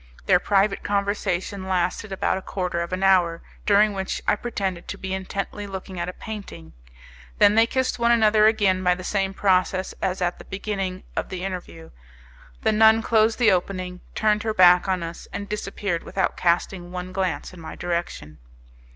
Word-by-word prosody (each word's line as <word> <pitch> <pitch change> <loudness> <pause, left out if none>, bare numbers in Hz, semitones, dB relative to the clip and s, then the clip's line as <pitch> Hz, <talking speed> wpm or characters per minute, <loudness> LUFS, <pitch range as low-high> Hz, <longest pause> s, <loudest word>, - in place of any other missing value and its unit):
Their 180 -2 +5
private 195 +1 +1
conversation 200 -1 -2
lasted 185 +2 -1
about 190 0 0
a - - -12
quarter 180 -3 -3
of 170 - -4
an 185 +1 -2
hour, 180 -3 +3 0.2
during 210 +1 +5
which 190 -1 -3
I - - +4
pretended 195 -6 -4
to - - -5
be 190 0 -5
intently 195 +2 -4
looking 190 -1 -7
at 170 +1 -2
a - - -6
painting; 200 - -9 0.6
then 205 - +6
they 225 +1 +5
kissed 260 0 -1
one 235 0 +3
another 215 -2 +5
again 200 -4 +2
by 180 -1 +3
the 185 - -9
same 195 0 0
process 185 -1 +1
as 190 -1 -1
at 180 -1 -1
the - - -11
beginning 190 -2 -4
of - - -2
the 185 0 -5
interview; 175 -3 -7 0.7
the - - +3
nun 220 +1 +5
closed 220 0 +3
the 235 -4 +4
opening, 180 0 -2
turned 210 -1 +2
her 220 0 -2
back 180 -1 +6
on 185 -2 0
us, 165 0 -7
and 200 0 -5
disappeared 195 -4 -3
without 190 - -1
casting 175 +1 0
one 180 0 -6
glance 185 -1 -2
in 180 - -12
my 160 - -8
direction. 170 - -4
190 Hz, 180 wpm, -24 LUFS, 180-205 Hz, 0.7 s, then